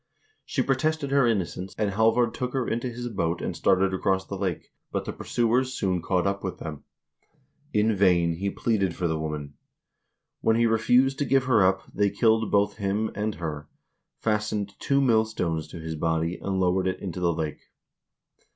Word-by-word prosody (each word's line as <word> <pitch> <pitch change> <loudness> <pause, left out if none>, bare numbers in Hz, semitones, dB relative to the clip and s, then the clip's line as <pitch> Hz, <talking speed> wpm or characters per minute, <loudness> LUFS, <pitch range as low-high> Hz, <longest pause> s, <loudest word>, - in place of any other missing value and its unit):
She 130 - 0
protested 140 +2 0
her 140 -3 +4
innocence, 95 -3 -2
and 105 -2 0
Halvard 115 +3 +3
took 125 +1 -3
her 130 -3 -1
into 120 +2 -1
his 120 0 -5
boat 85 -7 -1
and - - -3
started 95 0 +2
across 95 0 0
the 100 - -6
lake, 95 -4 -3 0.2
but - - -2
the - - -4
pursuers 125 +2 0
soon 90 -4 0
caught 90 +1 0
up 100 0 -1
with 95 - -4
them. 75 -3 -7 0.9
In 105 -1 +2
vain 85 -4 +3
he 100 +3 -1
pleaded 100 -5 0
for 90 - -1
the 80 -1 -1
woman. 75 -2 -4 0.9
When 110 - +2
he 115 +1 +3
refused 125 +4 +3
to 145 - +1
give 135 0 +3
her 120 -6 +4
up, 95 0 +2
they 100 0 +2
killed 110 +2 +2
both 100 0 +2
him 105 +1 -1
and 105 +1 -2
her, 75 -3 -5 0.5
fas 105 -1 0
tened 100 -1 -3
two 140 0 +2
millstones 110 - +1
to 85 - -9
his 80 0 -5
body 80 +2 -1
and 95 -1 -1
lowered 95 0 +2
it 95 - -2
into 90 -2 -5
the 85 -1 +2
lake. 80 -2 -3
100 Hz, 185 wpm, -26 LUFS, 90-115 Hz, 0.9 s, her